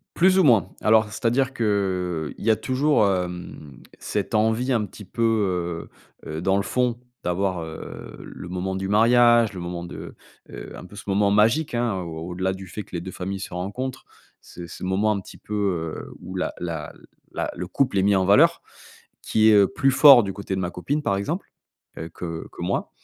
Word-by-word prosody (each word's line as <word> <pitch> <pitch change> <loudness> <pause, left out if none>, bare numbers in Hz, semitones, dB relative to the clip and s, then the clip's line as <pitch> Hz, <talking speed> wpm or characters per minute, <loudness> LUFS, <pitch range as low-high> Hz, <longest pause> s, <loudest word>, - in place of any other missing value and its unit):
Plus 185 +2 +4
ou - - +5
moins. 120 - +4
Alors, 110 0 +5
c'est-à-dire 120 +5 0
qu'il 95 - -1
y - - -1
a 110 - +6
toujours, 130 -2 +2
hem, 90 -6 -4 0.2
cette - - -3
envie 110 +4 +2
un 110 -3 +1
petit 105 +1 -12
peu, 95 -6 -1 0.4
heu - - -8
heu, 80 +1 -4
dans 95 +2 +2
le 100 - 0
fond, 120 +4 0 0.2
d'avoir, 90 0 -1
heu, 80 0 -9
le - - -9
moment 95 +1 -3
du 95 0 -3
mariage, 120 +1 +5
le 95 - -7
moment 85 0 -5
de 85 - -9 0.3
heu, - - -9
un - - -10
peu 95 - -13
ce 100 - -9
moment 100 0 +2
magique 115 +10 +3
hein, 120 -3 0
au 85 0 -6
au-delà 95 +2 -1
du 95 0 -9
fait 105 +4 -6
que 90 - -11
les 85 - -2
deux 95 - -7
familles 95 +2 -5
se 95 - -7
rencontrent. 100 +9 -4 0.4
C'est 85 0 -10
ce - - -10
moment 95 +4 +1
un 105 - 0
petit - - -13
peu, 105 - -9 0.4
heu, - - -9
où 95 - -8
la 90 - -2
la 80 -4 -4 0.4
la - - -3
le 90 - -5
couple 125 +2 0
est - - +2
mis 100 0 +4
en 95 -1 +2
valeur, 100 +2 +5 0.6
qui 110 0 +3
est, - - +6
heu, 100 -2 +6
plus 135 +7 +1
fort 135 -2 +8
du 100 -1 -4
côté 100 -1 -4
de - - -2
ma 90 - -1
copine 140 +14 -2
par 100 -9 0
exemple, 100 - -3 0.5
heu, 80 - -5
que 80 -1 -6
que - - -9
moi. - - -2
100 Hz, 205 wpm, -24 LUFS, 90-115 Hz, 0.6 s, fort